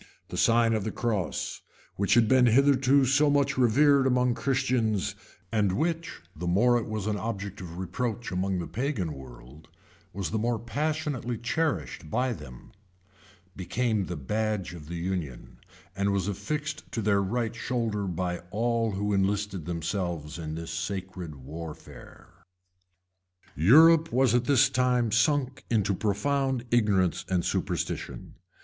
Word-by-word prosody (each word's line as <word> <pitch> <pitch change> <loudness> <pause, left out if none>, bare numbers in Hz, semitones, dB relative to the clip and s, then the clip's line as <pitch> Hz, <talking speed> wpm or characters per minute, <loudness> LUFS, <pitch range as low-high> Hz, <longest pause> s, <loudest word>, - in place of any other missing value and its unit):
The - - -6
sign 115 0 +3
of 110 -2 0
the 110 - -2
cross, 105 -8 -2 0.3
which 100 +1 +2
had 120 -2 +5
been 125 +1 +5
hitherto 135 +2 +4
so 140 +3 +3
much 140 -1 +2
revered 135 +3 +4
among 125 -1 +2
Christians, 120 -6 0 0.4
and 105 -4 +1
which, 165 - -2
the 90 +3 -5
more 120 +7 +4
it 115 - -5
was 110 -2 -3
an 105 -1 -1
object 100 -3 -5
of 85 -1 -8
reproach 110 +5 -3
among 95 +1 -1
the 85 - -3
pagan 120 - -2
world, 65 +3 -13 0.4
was 100 -2 -4
the 110 - 0
more 120 +1 0
passionately 135 0 -2
cherished 115 - -2
by 125 +5 0
them, 65 - -11 0.8
became 105 +2 -1
the 90 - -4
badge 105 +6 -2
of 80 -3 -10
union, 85 -8 -5 0.4
and 100 0 +1
was 100 -1 0
affixed 150 - -4
to 115 - -2
their 100 -1 +3
right 115 +3 -2
shoulder 115 -4 -2
by 90 0 -2
all 115 +1 0
who 105 +1 -1
enlisted 100 -2 0
themselves 85 -2 -3
in 80 -1 -5
this 80 0 -6
sacred 90 -1 -5
warfare.[] 80 +4 -11 1.1
Europe 160 - +6
was 125 -1 +3
at 120 0 +2
this 135 -1 +5
time 125 -3 +1
sunk 135 +3 +1
into 105 -4 +2
profound 125 +6 0
ignorance 100 -7 +2
and 90 -3 0
superstition. - - -3
110 Hz, 140 wpm, -27 LUFS, 90-125 Hz, 1.1 s, Europe